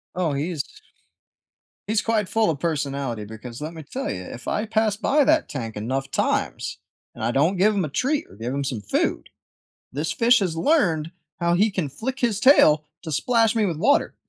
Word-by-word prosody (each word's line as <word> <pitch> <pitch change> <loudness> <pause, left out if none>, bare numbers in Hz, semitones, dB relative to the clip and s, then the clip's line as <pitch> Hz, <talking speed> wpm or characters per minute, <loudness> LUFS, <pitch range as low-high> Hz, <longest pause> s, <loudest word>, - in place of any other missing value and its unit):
Oh, 170 -5 0
he's 150 0 -2 1.2
he's 215 +1 +1
quite 220 -4 0
full 225 -5 +2
of 150 - -2
personality 140 -8 -2
because, 115 +4 -9
let 155 +2 -5
me 160 - -8
tell 275 - -4
you, - - -4
if 265 - -9
I 215 +1 -1
pass 215 -1 +1
by 285 +5 +2
that 315 0 +3
tank 115 -6 -5
enough 130 +6 -3
times - - -1 0.4
and - - -9
I 120 - +1
don't 160 +9 +2
give 210 +3 +3
him 190 -4 0
a - - -2
treat 265 - -1
or - - -15
give 115 +4 -4
him 140 0 -2
some 125 -5 -3
food, 100 - -1 0.6
this 150 +4 -2
fish 235 +1 +4
has 170 -4 -1
learned 165 - +2 0.3
how 170 0 +2
he 210 +4 +3
can 180 -7 -2
flick 260 - -5
his 220 -4 +1
tail 155 - +6 0.2
to 160 -3 -6
splash 230 - +2
me 215 -2 +2
with 165 -4 -2
water. 250 - +2
170 Hz, 195 wpm, -23 LUFS, 140-225 Hz, 1.2 s, tail